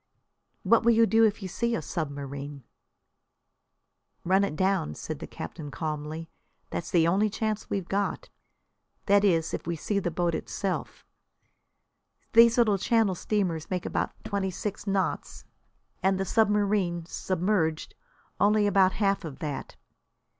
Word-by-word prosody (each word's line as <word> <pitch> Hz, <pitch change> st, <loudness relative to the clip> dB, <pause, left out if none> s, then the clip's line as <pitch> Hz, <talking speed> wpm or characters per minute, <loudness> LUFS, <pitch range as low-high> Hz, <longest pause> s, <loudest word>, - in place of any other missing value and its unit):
"What 225 Hz, +4 st, +5 dB
will 235 Hz, +1 st, +5 dB
you 230 Hz, 0 st, +5 dB
do 225 Hz, 0 st, +4 dB
if 215 Hz, -1 st, 0 dB
you -, -, -3 dB
see 235 Hz, +5 st, -1 dB
a -, -, -2 dB
submarine?' 140 Hz, -3 st, -5 dB, 1.6 s
"Run 190 Hz, +3 st, +3 dB
it 200 Hz, -, -2 dB
down," 185 Hz, -, 0 dB
said -, -, -6 dB
the -, -, -7 dB
captain 150 Hz, -3 st, -7 dB
calmly. 155 Hz, +1 st, -4 dB, 0.4 s
"That's 85 Hz, -, -4 dB
the 165 Hz, -2 st, +3 dB
only 200 Hz, +5 st, +3 dB
chance 215 Hz, 0 st, -3 dB
we've 195 Hz, -3 st, -2 dB
got. 200 Hz, +1 st, -1 dB, 0.8 s
That 200 Hz, 0 st, +4 dB
is, 165 Hz, -5 st, +2 dB
if -, -, -4 dB
we 170 Hz, -, -1 dB
see 200 Hz, +6 st, -1 dB
the 180 Hz, -, -1 dB
boat 175 Hz, 0 st, 0 dB
itself. 190 Hz, +3 st, -4 dB, 1.3 s
These 230 Hz, +1 st, +7 dB
little 215 Hz, -5 st, +3 dB
Channel 225 Hz, -2 st, +2 dB
steamers 180 Hz, -4 st, -1 dB
make 180 Hz, -1 st, -2 dB
about -, -, -1 dB
twenty 200 Hz, -3 st, -1 dB
six 205 Hz, +3 st, -5 dB
knots, 195 Hz, -1 st, -1 dB, 0.6 s
and 190 Hz, 0 st, +2 dB
the 195 Hz, -, 0 dB
submarine, 205 Hz, -5 st, +1 dB
submerged, 175 Hz, -3 st, -1 dB, 0.5 s
only 210 Hz, +1 st, +4 dB
about 195 Hz, -2 st, +4 dB
half 200 Hz, -1 st, +1 dB
of 155 Hz, -5 st, -7 dB
that. 145 Hz, -4 st, -5 dB
190 Hz, 140 wpm, -27 LUFS, 165-210 Hz, 1.6 s, These